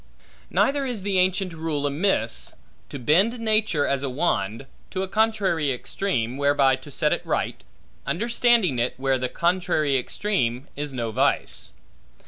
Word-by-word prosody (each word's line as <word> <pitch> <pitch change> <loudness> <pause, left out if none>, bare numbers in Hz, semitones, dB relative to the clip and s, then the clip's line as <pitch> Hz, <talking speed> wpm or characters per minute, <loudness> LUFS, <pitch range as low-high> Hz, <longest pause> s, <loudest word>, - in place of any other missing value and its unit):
Neither 280 0 +2
is 245 -7 -3
the 195 -2 +1
ancient 185 0 +1
rule 160 -3 -2
amiss, 140 - 0 0.3
to - - -6
bend 185 - +2
nature, 215 -9 +2
as 140 -1 0
a 140 - -2
wand, 125 - -1 0.2
to 190 - -2
a - - -3
contrary 200 -8 +1
extreme, 125 - -2
whereby 140 -2 +3
to 135 +3 -13
set 150 +2 +1
it - - -2
right, - - -2 0.4
understanding 230 - +2
it, 120 +2 0
where 135 0 +1
the 125 0 -1
contrary 170 -4 +1
extreme 125 - -1
is 145 0 -4
no 120 -3 -3
vice. - - 0
150 Hz, 145 wpm, -24 LUFS, 135-195 Hz, 0.4 s, whereby